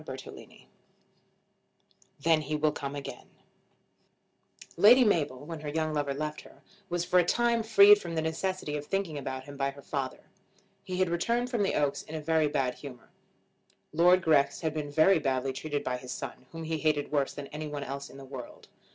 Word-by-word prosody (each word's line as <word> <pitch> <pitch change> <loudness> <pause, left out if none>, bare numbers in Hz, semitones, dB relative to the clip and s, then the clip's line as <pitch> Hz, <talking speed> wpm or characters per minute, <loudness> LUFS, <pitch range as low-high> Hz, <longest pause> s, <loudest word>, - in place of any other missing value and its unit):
CHAPTER - - -8
XX - - -14 1.6
"Then 160 +1 +3
He 150 +1 -3
Will 150 0 +2
Come 140 -1 -5
Again" 140 - -7 1.5
Lady 245 +5 +7
Mabel, 145 - 0
when 165 0 -6
her 150 0 -5
young 155 +1 -1
lover 145 -2 -1
left 150 +1 -4
her, - - -18 0.3
was 175 0 -1
for 180 +1 +4
a - - +5
time 235 +5 +2
freed 205 -1 +7
from 170 -1 -5
the 160 - +1
necessity 160 -1 -2
of 145 - -7
thinking 195 -5 -2
about 130 -1 -5
him 140 +1 -11
by 135 0 0
her 140 0 -11
father. 135 -3 -4 0.6
He 185 -2 -4
had 185 -1 +2
returned 235 +8 0
from 235 -4 0
the 195 - +1
Oaks 145 -1 0
in 160 - -9
a - - -2
very 160 0 +2
bad 135 -3 0
humour. 125 -4 -11 0.8
Lord 180 +3 +5
Grex 140 -3 +3
had 160 -2 -1
been 150 -2 -4
very 160 +5 +4
badly 135 -2 -1
treated 145 +1 -3
by 125 -1 -2
his 125 0 -9
son, 130 - -7
whom 165 0 -7
he 160 0 -2
hated 150 -2 0
worse 140 -2 0
than 145 - -6
any 155 +1 -6
one 145 -1 -5
else 140 +1 -6
in - - -13
the 135 - -10
world. 130 -2 -10
155 Hz, 195 wpm, -29 LUFS, 140-175 Hz, 1.6 s, Lady